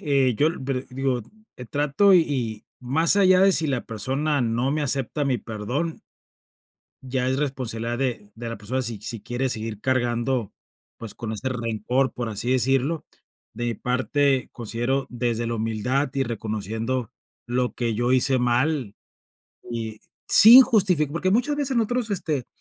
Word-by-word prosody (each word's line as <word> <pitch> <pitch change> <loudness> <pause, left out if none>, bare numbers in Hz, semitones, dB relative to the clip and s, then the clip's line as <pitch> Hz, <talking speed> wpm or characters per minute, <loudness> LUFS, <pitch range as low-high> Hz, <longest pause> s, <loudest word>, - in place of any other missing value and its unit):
eh, 140 -7 +2
yo 150 +6 +3
lo 165 - -8
pero 130 -1 -2
digo, 130 -1 -1 0.3
eh, 125 - -8
trato 145 - +2
y 130 - +1
más 160 +9 +4
allá 185 -2 +5
de 195 0 +5
si 160 - +3
la 135 -4 -2
persona 135 +6 -1
no 120 +3 0
me 155 0 -1
acepta 140 +1 0
mi 130 -3 0
perdón 120 +11 -4 1.0
ya 130 -1 -1
es 130 - 0
responsabilidad 120 -4 -3
de 125 -6 -3
de 115 +1 -7
la 115 - -5
persona 120 +6 -3
si 115 -4 -5
si 115 +1 -6
quiere 120 +4 -2
seguir 110 -3 -3
cargando, 120 -2 -1 0.4
pues, 115 -2 -9
con 110 -2 -6
este 110 +4 -4
rencor, 120 +2 -1
por 120 -2 -4
así 110 +3 -3
decirlo. 135 +5 0 0.5
De 120 - -5
mi 120 - -1
parte 130 +3 0
considero 120 +4 -2
desde 120 -1 -2
la 115 - -2
humildad 115 +5 -1
y 135 - +1
reconociendo 115 +1 -3 0.4
lo 125 +1 -1
que 115 -2 -1
yo 120 +3 +1
hice 130 +1 +3
mal, 125 -1 0 0.8
y 110 -2 -5 0.3
sin 235 +5 +10
justifi 200 - +2
porque 170 +6 -1
muchas 250 +8 +1
veces 280 -3 -2
nosotros 235 +1 -1
este, 155 - -2
130 Hz, 160 wpm, -23 LUFS, 115-145 Hz, 1.0 s, sin